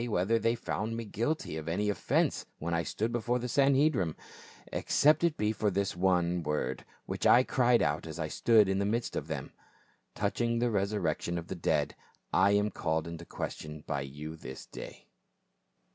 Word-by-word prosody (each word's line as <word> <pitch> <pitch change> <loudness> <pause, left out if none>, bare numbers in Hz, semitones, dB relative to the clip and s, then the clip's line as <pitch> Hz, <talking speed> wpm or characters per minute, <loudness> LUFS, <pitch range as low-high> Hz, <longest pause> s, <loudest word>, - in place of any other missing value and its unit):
whether 110 +3 +2
they 115 +2 +2
found 115 0 -3
me 115 - -4
guilty 115 - -2
of 80 0 -6
any 100 +5 0
offence 105 -4 0
when 85 +2 -3
I 85 - +2
stood 110 +6 -2
before 120 +1 0
the 125 0 -3
Sanhedrim, 135 - +3 0.6
except 150 +3 +3
it 170 -3 +2
be 105 0 +1
for 110 -1 0
this 100 -1 -1
one 90 -1 +2
word 75 -4 -2 0.2
which - - -1
I 125 - +7
cried 125 -2 +3
out 75 +2 -1
as 80 - -7
I 80 -2 -2
stood 110 +5 +4
in 95 0 +1
the 100 - +1
midst 115 +3 -1
of 75 - -3
them: 75 -4 -5 0.6
Touching 115 +3 0
the 120 0 +1
resurrection 95 -5 -1
of 85 0 -6
the - - -3
dead 85 - 0 0.4
I 95 +2 +5
am 105 +1 +2
called 80 -2 -1
in 85 -1 -6
question 75 -2 -6
by 70 -3 -1
you 75 +4 -7
this 65 -4 -9
day - - -10
100 Hz, 180 wpm, -31 LUFS, 80-115 Hz, 0.6 s, I